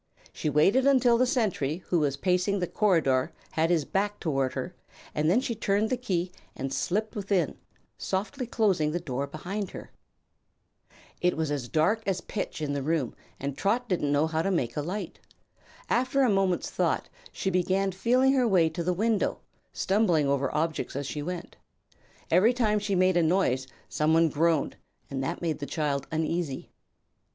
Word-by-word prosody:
She 155 - -2
waited 195 - +4
until 250 -4 +4
the 255 - +4
sentry 185 - 0
who 175 - +3
was 140 -2 0
pacing 180 +5 +1
the 180 - 0
corridor 160 -11 +2 0.2
had 160 +1 +1
his 165 -5 +2
back 205 +1 -1
toward 135 -6 0
her 135 +7 -4 0.4
and 155 +1 +1
then 200 +8 +4
she 255 -2 -2
turned 210 0 0
the - - +3
key 185 -8 -2 0.2
and 135 0 -4
slipped 215 +5 -1
within, 195 -6 0 0.4
softly 220 +7 -3
closing 195 -10 +2
the 175 - 0
door 140 -4 -3
behind 185 +7 -4
her. - - -10 1.3
It 180 -2 +2
was 145 -6 -2
dark 175 +9 +2
as 190 -2 +1
pitch 175 -3 -5
in 145 -1 -1
the 140 - -2
room 150 -3 -1 0.3
and 140 0 -3
Trot 230 - 0
didn't 170 -7 0
know 145 +2 +3
how 160 0 0
to 195 - 0
make 130 -11 -1
a 150 - -1
light. 185 +8 -5 0.7
After 260 +2 +2
a 250 - +4
moment's 195 -3 +1
thought - - 0 0.2
she 190 - -2
began 190 +2 +1
feeling 250 +8 +3
her 255 -3 +3
way 175 -6 +4
to 170 +2 -4
the 180 +2 +1
window, 215 +3 0 0.3
stumbling 190 -7 +2
over 140 -1 +1
objects 160 -2 -2
as 140 +1 -3
she 145 +2 -4
went. 175 +3 -6 0.7
Every 195 +9 +5
time 215 -4 +2
she 205 -1 -1
made 185 0 +3
a - - +4
noise 155 -7 +1 0.2
some 155 +1 +1
one 165 0 +4
groaned, 160 +1 +1 0.3
and 135 -1 -2
that 135 - -3
made 160 -2 -1
the 145 - -5
child 140 -2 -1
uneasy. 160 -3 -2
175 Hz, 175 wpm, -28 LUFS, 150-205 Hz, 1.3 s, Every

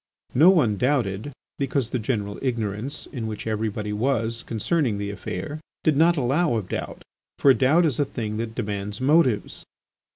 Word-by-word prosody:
No 155 +8 +7
one 130 - +3
doubted 120 -2 0 0.3
because 135 -3 -1
the 125 - 0
general 105 -3 -2
ignorance 115 0 -2
in 115 -5 -5
which 110 -1 -5
everybody 105 -1 -2
was 115 0 0
concerning 120 - 0
the 100 0 -3
affair 100 +8 -5 0.2
did 155 - +3
not 165 +3 +4
allow 140 +2 +2
of 105 -5 -3
doubt, - - -5 0.3
for 140 - +6
doubt 145 +7 +4
is 145 -7 0
a 145 - +3
thing 110 -5 -4
that 115 0 -4
demands 105 -2 -4
motives. 130 -4 +2
115 Hz, 160 wpm, -24 LUFS, 105-140 Hz, 0.3 s, No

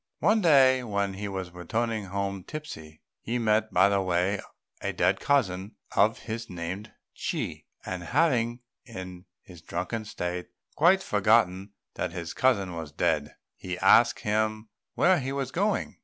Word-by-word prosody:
One 215 +1 +3
day 135 -6 +6
as 100 -4 -1
he 105 +1 -4
was 95 -2 -5
returning 110 +5 -2
home 100 0 -3
tipsy, 80 - -9 0.2
he 120 +2 -3
met 110 -1 +1
by - - +5
the 100 -1 +2
way 95 +2 0 0.4
a - - -2
dead - - +2
cousin 100 -9 0 0.2
of - - +4
his 115 +1 -5
named 90 +5 -5 0.2
Chi; - - -4 0.2
and 90 -1 -4
having, 120 - +1 0.2
in 90 -6 -9 0.2
his 90 -3 -14
drunken 95 +7 -4
state, 90 -4 -4 0.3
quite 190 +3 +4
forgotten 100 -2 +2 0.2
that - - -3
his 85 -2 -5
cousin 100 -9 +2
was 80 -3 -6
dead, 75 -2 0 0.2
he 90 -1 -5
asked - - +5
him 110 +1 -1 0.3
where 180 -1 +4
he 135 0 -3
was 135 -1 -3
going. 205 +6 -1
100 Hz, 150 wpm, -27 LUFS, 90-120 Hz, 0.4 s, day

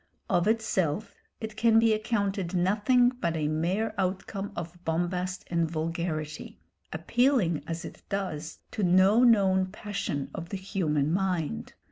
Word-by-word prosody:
Of 175 +2 +3
itself 215 -4 0 0.3
it 220 -1 -6
can 225 0 +4
be 225 -1 +5
accounted 200 -4 -1
nothing 210 +7 +3
but 170 -10 -2
a 150 -1 0
mere 175 +8 0
outcome 195 +2 -2
of 170 +1 -7
bombast 180 +2 -1
and 170 -2 0
vulgarity, 160 -1 -4 0.3
appealing 180 - +1
as 165 0 -4
it - - -10
does 185 -6 -3
to 220 - -3
no 190 +5 +5
known 190 -5 +4
passion 185 -8 -4
of 170 0 -6
the 195 - -3
human 160 -6 0
mind. 180 - -1
185 Hz, 135 wpm, -28 LUFS, 165-210 Hz, 0.3 s, be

